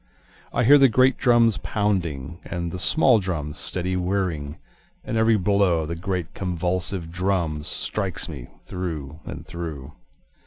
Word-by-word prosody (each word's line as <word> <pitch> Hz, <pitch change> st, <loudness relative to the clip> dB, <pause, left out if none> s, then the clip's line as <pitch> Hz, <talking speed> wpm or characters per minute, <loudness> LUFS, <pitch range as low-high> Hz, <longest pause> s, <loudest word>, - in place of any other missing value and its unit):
I 120 Hz, -, +1 dB
hear 145 Hz, +5 st, +7 dB
the 135 Hz, -1 st, +7 dB
great 130 Hz, +3 st, +4 dB
drums 120 Hz, -3 st, +4 dB
pounding, 85 Hz, -7 st, -2 dB
And 85 Hz, -1 st, -4 dB
the 90 Hz, -, -5 dB
small 130 Hz, -, +4 dB
drums 80 Hz, -6 st, -4 dB
steady 90 Hz, 0 st, -3 dB
whirring, 90 Hz, -5 st, -2 dB, 0.5 s
And -, -, -4 dB
every 110 Hz, 0 st, +4 dB
blow 100 Hz, -3 st, +2 dB
of 75 Hz, -, -6 dB
the 85 Hz, -, -2 dB
great 90 Hz, -1 st, -3 dB
convulsive 90 Hz, -1 st, -2 dB
drums, 85 Hz, -4 st, -1 dB
Strikes 95 Hz, -5 st, -2 dB
me -, -, -8 dB, 0.2 s
through 80 Hz, -5 st, -5 dB
and -, -, -7 dB
through. 75 Hz, -5 st, -7 dB
90 Hz, 145 wpm, -24 LUFS, 80-100 Hz, 0.5 s, hear